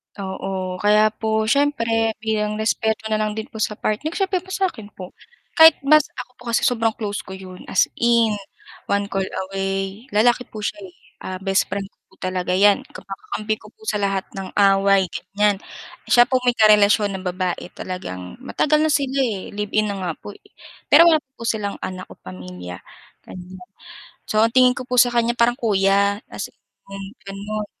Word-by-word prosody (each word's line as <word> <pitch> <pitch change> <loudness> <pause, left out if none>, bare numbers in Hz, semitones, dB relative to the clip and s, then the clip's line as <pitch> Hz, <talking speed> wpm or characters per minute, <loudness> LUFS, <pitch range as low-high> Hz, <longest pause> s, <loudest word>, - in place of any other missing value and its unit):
Oo, 190 -1 -4
kaya 210 +1 +4
po 220 0 -1
siyempre 230 -5 +1
bilang 215 -1 -1
respeto 220 0 0
na 215 - +1
lang 215 -1 -1
din 220 +3 -5
po - - -9
sa 210 0 -1
partner 220 +11 -2
siyempre 385 -2 0
pa 365 - -19
sa 380 -1 +1
akin 220 -4 -11
po. 185 -1 -9 0.5
Kahit 320 0 +9
mas 305 +1 +5
ako 250 0 -7
po - - -21
kasi 230 - +2
sobrang 225 -2 +2
close 210 -2 -4
ko 190 - -8
yun 185 -1 -11
as - - +3 0.2
in, 235 -2 +3 0.6
one 200 0 -1
call 195 -1 -1 0.2
away, 195 +3 -3
lalaki 240 +3 +3
po 215 -1 -8
siya, 205 0 -3
eh. 180 - -19 0.3
Ah, 185 0 -5
best 195 0 +1
friend 200 0 -3
ko - - -44
po - - -24
talaga 185 -1 -2
'yan 200 +1 +4
kumbaga - - -8 0.2
kamkampi 215 0 -1
ko - - -15
po 440 - -34
sa - - +1
lahat 195 -1 0
ng 190 -1 -6
away, 195 -1 +4 0.3
ganyan. 205 -1 +3 0.5
Siya 240 - +7
po 255 - +2
may 245 -1 +3
karelasyon 210 -1 +5
na - - -9
babae 180 -1 -3
talagang 90 - -6
matagal 300 +3 +1
na 315 - +2
sila, 275 -1 0
eh, 210 -7 -3
live-in 210 +1 -1
na - - -4
nga 180 -2 -2
po, - - -9 0.6
pero 335 - +7
wala 320 -2 +5
pa 265 - -61
po - - -7
silang 205 -3 -1
anak 185 0 -6
o - - -11
pamilya 90 -1 -9 0.5
ganyan. 185 +1 -10 0.7
So 215 - +2
ang 230 - +1
tingin 255 -1 +7
ko 255 - -5
po 250 - -1
sa 245 0 +4
kanya 235 0 +2
parang 235 +1 +3
kuya, 200 -3 +2
kasi - - -6 0.3
mm, 195 0 -8 0.2
ganon. 205 +2 -5
210 Hz, 190 wpm, -21 LUFS, 195-230 Hz, 0.7 s, Kahit